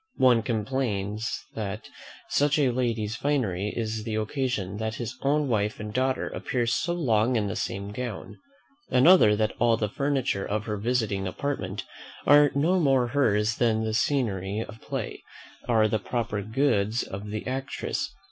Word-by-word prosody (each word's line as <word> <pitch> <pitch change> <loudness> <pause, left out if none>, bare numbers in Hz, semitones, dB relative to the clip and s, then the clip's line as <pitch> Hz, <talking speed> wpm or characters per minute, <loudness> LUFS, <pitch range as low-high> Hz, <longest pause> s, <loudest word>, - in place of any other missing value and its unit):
One 125 -3 +5
complains 110 -2 -2
that 100 -3 -5 0.4
such 145 +1 +2
a 140 -4 +3
lady's 115 -4 -1
finery 110 -8 0
is 110 -1 -2
the 110 -1 -3
occasion 110 -4 -2
that 110 0 -3
his 120 -3 -5
own 145 +1 +2
wife 105 -3 0
and 105 0 -6
daughter 130 +1 0
appear 125 -2 -2
so 150 +9 0
long 120 -7 +2
in 110 -3 +1
the 100 - -3
same 100 +1 -3
gown. 115 -2 -6 0.5
Another, 130 - +6
that 110 0 0
all 115 -1 +4
the 105 -2 -1
furniture 135 -5 0
of 105 +1 -2
her 105 -2 -2
visiting 105 -3 0
apartment 100 -3 -3 0.4
are 145 +1 +7
no 170 +6 +3
more 135 -6 +3
hers 110 -6 +2
than 110 -2 +2
the 110 0 -1
scenery 105 -7 0
of 110 -1 -8
a - - -25
play - - -5 0.5
are 110 -3 +4
the 110 0 0
proper 110 -1 -2
goods 110 -1 +1
of 100 +2 -7
the 105 0 -4
actress. 135 +2 -3
115 Hz, 160 wpm, -27 LUFS, 105-130 Hz, 0.5 s, are